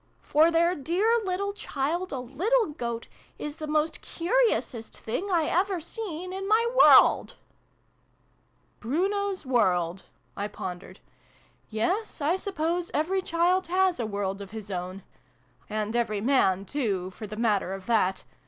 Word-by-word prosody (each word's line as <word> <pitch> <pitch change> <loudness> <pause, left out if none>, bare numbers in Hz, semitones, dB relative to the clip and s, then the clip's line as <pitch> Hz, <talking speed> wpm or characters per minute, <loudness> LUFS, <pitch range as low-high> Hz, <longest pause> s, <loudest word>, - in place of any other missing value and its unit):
For 310 +3 +4
their 340 +1 +3
dear 370 - +1
little 395 +1 -2
child, 340 0 -2
a 270 - -3
little 345 - 0
Goat, 235 -5 -4 0.3
is 295 +1 -6
the 310 - -5
most 305 +1 0
curiousest 350 - 0
thing 355 - -3
I 335 -3 +3
ever 370 +3 +1
seen 365 0 -6
in 390 +1 -4
my 445 +2 +4
world! - - +6 0.7
" - - -40
"Bruno's 385 - -1
World!" 185 -8 +1 0.3
I 205 - -2
pondered. 180 -3 -8 0.7
"Yes, 355 - -1
I 305 +4 +2
suppose 350 -2 -2
every 370 +6 +1
child 360 +2 +1
has 370 -1 +2
a 230 - -1
world 200 -1 -3
of 200 - -8
his 215 -1 -8
own 185 +1 -5 0.7
and 215 +1 -2
every 220 -3 0
man, 200 -5 +2
too, 195 -8 -2
for 215 +3 -8
the 215 +1 -8
matter 210 -5 +1
of 190 -1 -10
that. 200 -5 +1
300 Hz, 145 wpm, -27 LUFS, -, 0.7 s, world